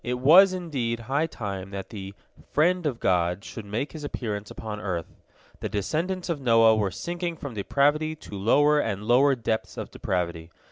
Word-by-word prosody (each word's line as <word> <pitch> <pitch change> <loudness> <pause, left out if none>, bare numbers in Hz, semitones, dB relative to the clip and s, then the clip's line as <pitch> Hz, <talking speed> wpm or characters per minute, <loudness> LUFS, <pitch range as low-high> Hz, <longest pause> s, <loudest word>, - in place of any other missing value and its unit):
" - - -42
It 125 0 -2
was, 170 +9 +7
indeed, 135 -11 -3
high 140 +7 0
time 100 - -5
that 95 -1 -6
the 100 -2 -8 0.3
"friend 175 +2 +2
of 125 -5 -3
God" 90 0 +1
should 110 - -8
make 110 +8 -3
his 155 -2 -8
appearance 105 -7 -4
upon 105 -2 -6
earth. 90 -5 -4 0.5
The - - -4
descendants 170 - -2
of 165 -5 -2
Noah 115 -3 +5
were 105 -3 +1
sinking 175 - -4
from 140 -4 -7
depravity 145 +9 +1
to 150 - -10
lower 145 +9 +4
and 105 -6 -2
lower 130 +5 +4
depths 110 -2 -3
of - - -6
depravity. 85 -3 -3
115 Hz, 180 wpm, -26 LUFS, 100-150 Hz, 0.5 s, was